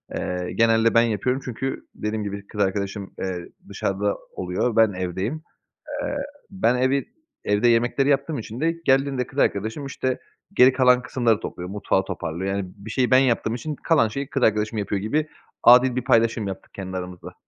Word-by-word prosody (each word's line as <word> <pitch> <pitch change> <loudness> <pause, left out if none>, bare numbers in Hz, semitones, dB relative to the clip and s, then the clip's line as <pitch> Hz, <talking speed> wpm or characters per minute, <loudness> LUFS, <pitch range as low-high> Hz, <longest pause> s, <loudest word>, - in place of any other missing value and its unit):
eee, 90 0 -3
genelde 115 0 +4
ben 115 - +6
yapıyorum 120 +4 0
çünkü 130 +2 -4
dediğim 105 0 -3
gibi 100 0 -6
kız 105 - -4
arkadaşım, 100 0 -2
eee, 90 -2 -4 0.2
dışarıda 100 +1 -1 0.2
oluyor, 95 +6 -1
ben 110 -2 +5
evdeyim. 95 - -3 0.6
Eee, 285 0 -3 0.3
ben 190 - +1
evi 130 +2 +1 0.4
evde 105 +4 +2
yemekleri 120 +4 +2
yaptığım 145 +1 +1
için 115 +2 -7
de 165 +1 +2
geldiğinde 135 -2 +2
kız 140 - -12
arkadaşım, 110 +5 0
işte, 130 -1 -2 0.3
geri 125 +1 +6
kalan 125 -1 +4
kısımları 120 -4 +1
topluyor, 90 0 -6
mutfağı 100 -1 0
toparlıyor. 95 +1 -3
Yani, 95 -2 -4
bir 105 +2 -10
şeyi 125 +1 +1
ben 130 - +7
yaptığım 120 -4 +2
için 150 +5 -4
kalan 160 -8 +2
şeyi 140 +5 -4
kız 135 -1 -2
arkadaşım 110 0 +2
yapıyor 100 -1 -1
gibi 150 +10 -1 0.3
adil 125 +1 +7
bir 125 - 0
paylaşım 115 -4 +2
yaptık 95 - -8
kendi 95 -1 -6
aramızda. 90 -1 -7
115 Hz, 170 wpm, -23 LUFS, 100-130 Hz, 0.6 s, ben